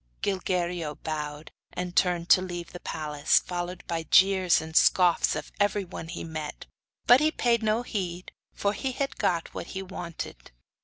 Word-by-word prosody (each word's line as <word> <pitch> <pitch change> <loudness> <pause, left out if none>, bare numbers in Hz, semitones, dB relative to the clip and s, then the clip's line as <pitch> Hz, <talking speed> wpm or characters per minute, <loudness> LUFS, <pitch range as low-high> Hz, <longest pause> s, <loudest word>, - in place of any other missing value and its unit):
Gilguerillo 180 -5 -1
bowed, 150 -1 -4 0.2
and 180 0 -4
turned 175 -2 +2
to 185 - +7
leave 175 -2 -6
the 175 - -8
palace, 150 -3 0
followed 175 0 -3
by 165 -1 -2
the 160 - -13
jeers 190 -2 +5
and 160 0 -8
scoffs 175 0 +4
of 150 0 -6
everyone 200 -5 -1
he 170 - -6
met. 155 -2 -6 0.4
But 245 +2 +8
he 305 +2 +3
paid 240 -6 +1
no 220 +2 +1
heed, 180 -6 -4 0.2
for 200 0 -1
he 260 +3 -3
had 275 +2 -3
got 170 -2 0
what - - -6
he 190 - -3
wanted. 170 - -7
175 Hz, 165 wpm, -27 LUFS, 165-195 Hz, 0.4 s, But